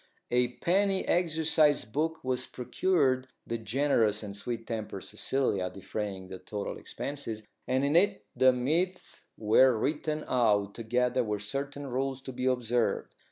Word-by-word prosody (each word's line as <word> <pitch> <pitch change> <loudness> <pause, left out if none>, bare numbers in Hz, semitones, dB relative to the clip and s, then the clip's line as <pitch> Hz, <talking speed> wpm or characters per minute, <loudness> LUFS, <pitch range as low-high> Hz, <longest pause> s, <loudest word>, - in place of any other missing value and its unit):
A 125 0 +2
penny 190 +6 +1
exercise 160 -4 +3
book 160 +8 -2
was 130 -1 -1
procured 130 -1 +1 0.2
(the 115 - -3
generous 110 -2 +1
and 100 -1 -6
sweet 115 +3 -4
tempered 110 -4 -4
Cecilia 105 -4 0
defraying 95 0 -5
the 95 0 -8
total 100 +2 -5
expense), 140 0 -5 0.4
and 130 +2 +2
in 145 +3 +1
it 170 - +3
the 130 0 +6
myths 165 +9 -1
were 115 +3 +5
written 150 +4 -1
out, 105 -5 +2
together 125 +2 +1
with 105 -2 -2
certain 140 +6 -3
rules 135 +1 -2
to 130 - -6
be 125 +1 -2
observed. 120 -2 0
125 Hz, 140 wpm, -30 LUFS, 110-145 Hz, 0.4 s, the